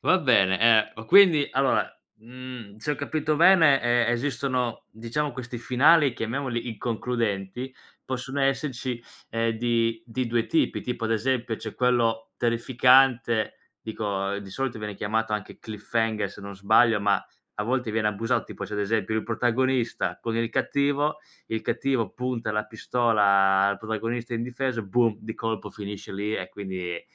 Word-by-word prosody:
Va 185 - +3
bene. 95 - +3
Ehm, 115 -1 +5
ma 110 - -8
quindi 165 - +6
allora, 135 +1 +2 0.3
mhmm, 120 -2 -10
se 150 - -3
ho - - +1
capito 150 +2 -1
bene, 165 -5 +6
ehm, 120 0 +2
esistono 125 -1 -2
diciamo 120 +7 -3
questi 120 -1 -7
finali 135 +4 +4
chiamiamoli 120 +1 -3
inconcludenti, 115 0 -3 0.3
possono 130 +2 -4
esserci, 130 -3 -1 0.3
ehm, 115 0 0
di 115 -1 0 0.2
2 115 -1 0
tipi. 165 - +1
Tipo 125 -2 -4
ad 115 - 0
esempio 120 +1 0
c'è 110 - -7
quello 115 -3 +1
terrificante, 120 0 +3 0.3
dico 100 -3 -3
di 100 - -11
solito 130 +2 -3
viene 105 -1 -5
chiamato 110 +2 -1
anche 105 -2 -4
Cliffhanger, 110 +1 -2
se - - -12
non 100 -1 -8
sbaglio, 110 +3 +4
ma 100 -1 +1 0.3
a 105 - -1
volte 125 0 -1
viene 110 -1 +1
abusato: 115 +2 -1
tipo - - -7
se - - -10
ad 105 - -2
esempio 110 0 -1
il 110 - 0
protagonista 120 +1 0
con 115 -1 -3
il 115 0 -1
cattivo, 140 +3 0 0.3
il 110 - -3
cattivo 120 -3 -1
punta 125 -3 -3
la 105 0 -1
pistola 100 -4 +2
al 100 - -2
protagonista 115 +2 -4
indifeso, 120 0 -2
boom, 115 +2 +1
di 110 0 -7
colpo 115 -1 -4
finisce 100 -2 -8
lì 105 +2 -2
e - - -4
quindi 95 -4 -5
115 Hz, 155 wpm, -25 LUFS, 110-130 Hz, 0.3 s, quindi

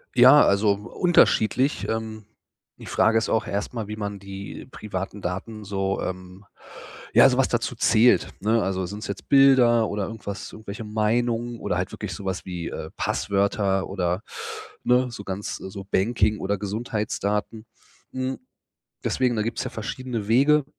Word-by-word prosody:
Ja, - - +8
also 100 +1 +3
unterschiedlich. 130 - +2
Ähm, 110 -1 -4 0.5
die - - -12
Frage 115 - +3
ist 110 - 0
auch 110 0 +1
erstmal, 105 +2 -3
wie 105 - -5
man 100 -1 -5
die 100 0 -8
privaten 100 -2 -5
Daten 105 +5 -5
so, 95 -1 -2
ähm 95 +1 -6 0.7
ja, - - +8
so 125 - 0
was 135 - +3
dazu 120 +1 -1
zählt, 115 +1 +4
ne? 110 +2 +2
Also, 95 0 -1
sind 100 +4 -6
es - - -6
jetzt 100 - -7
Bilder 130 -5 +6
oder 100 -1 -2
irgendwas 100 -4 -7
irgendwelche 110 0 -8
Meinungen 115 +2 0
oder 90 - -1
halt 90 +1 -2
wirklich 105 -4 -5
sowas 95 +2 -4
wie, 90 -2 -5
äh, 80 - -6
Passwörter 100 -1 0
oder, 90 -1 -1 0.6
ne, 125 +1 +3
so 105 - -8
ganz 100 +1 -4
so 95 +1 -8
Banking 105 +1 +2
oder 100 +2 -1
Gesundheitsdaten. 105 +1 -3 0.5
Hm, 130 0 -3 0.6
deswegen, 125 -2 +1
da 110 - 0
gibt's 115 +2 -2
ja - - -4
verschiedene 115 0 -4
Wege. 140 +6 +4
105 Hz, 155 wpm, -24 LUFS, 100-115 Hz, 0.7 s, Ja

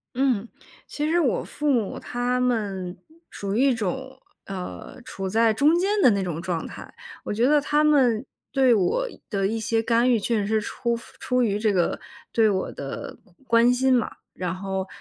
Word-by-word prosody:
嗯， 250 -5 +1 0.4
其 300 +1 -2
实 345 +2 +3
我 280 -8 +1
父 295 -1 -1
母 230 -7 0
他 245 +1 -1
们 200 -7 -1 0.3
属 200 -1 -4
于 250 +6 +3
一 - - +3
种， 260 +5 -4 0.3
呃， 190 +4 -7
处 190 0 -5
在 225 +2 +3
中 295 +9 +4
间 370 +3 +1
的 - - +7
那 200 -2 0
种 170 -3 -4
状 170 -2 -3
态。 - - -10 0.3
我 - - -4
觉 230 +3 +2
得 295 0 +4
他 295 +1 +2
们 260 -6 +3 0.3
对 260 -2 +4
我 230 - +1 0.2
的 195 -2 0
一 220 +3 -1
些 225 +1 0
干 235 +2 +3
预 235 -3 +3
确 225 +2 0
实 200 - -1
是 220 0 +2
出 235 +2 -2 0.2
出 250 0 +1
于 205 -3 0
这 215 -1 +2
个 180 -3 +1 0.3
对 225 -2 +4
我 190 -2 -1
的 135 -1 -7 0.3
关 230 0 +4
心 260 +1 +3
嘛， 240 -3 +1 0.2
然 180 -1 -3
后， 190 0 -3
230 Hz, 200 characters per minute, -24 LUFS, 195-255 Hz, 0.4 s, 的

